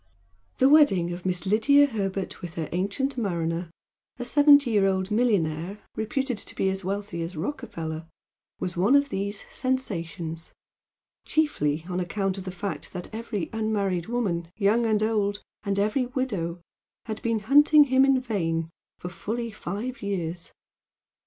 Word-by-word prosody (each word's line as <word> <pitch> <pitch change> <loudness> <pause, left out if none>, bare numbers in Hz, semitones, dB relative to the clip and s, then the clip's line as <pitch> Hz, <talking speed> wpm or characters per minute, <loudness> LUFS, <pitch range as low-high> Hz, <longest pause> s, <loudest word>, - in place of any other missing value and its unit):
The 260 - +5
wedding 195 - +5
of 175 +1 -5
Miss 180 0 0
Lydia 280 +9 +5
Herbert 195 -7 -3
with 170 -2 -7
her 160 -2 -3
"ancient 205 +10 -1
mariner," 170 -4 -1 0.5
a 245 - -4
seventy 285 -1 +6
year 200 -3 +4
old 190 +1 0
millionaire 195 -6 +1 0.2
reputed 250 +1 -1
to - - -8
be 190 - +1
as 190 0 -4
wealthy 195 -2 -3
as 165 +1 -5
Rockefeller, 160 - -4 0.5
was 180 - -3
one 200 +10 +4
of 285 0 +4
these 200 -2 -3
"sensations" 170 - -3 0.7
chiefly 160 - 0
on 180 0 -2
account 195 +2 -1
of 190 - -8
the 185 - -4
fact 195 +2 -5
that 180 +3 -7
every 220 -6 -4
unmarried 200 -6 -1
woman 200 -8 -1
young 225 +3 +3
and 215 -1 +2
old, 210 -2 0 0.2
and 200 -2 -1
every 215 +6 +1
widow, 200 -10 -2 0.5
had 220 -1 -5
been 230 -2 0
hunting 295 +6 +7
him 265 -1 +4
in 270 -1 +4
vain 165 -9 -2 0.3
for 180 - -6
fully 230 +5 -4
five 215 +7 -5
years. 175 -4 -3
200 Hz, 150 wpm, -26 LUFS, 175-240 Hz, 0.7 s, hunting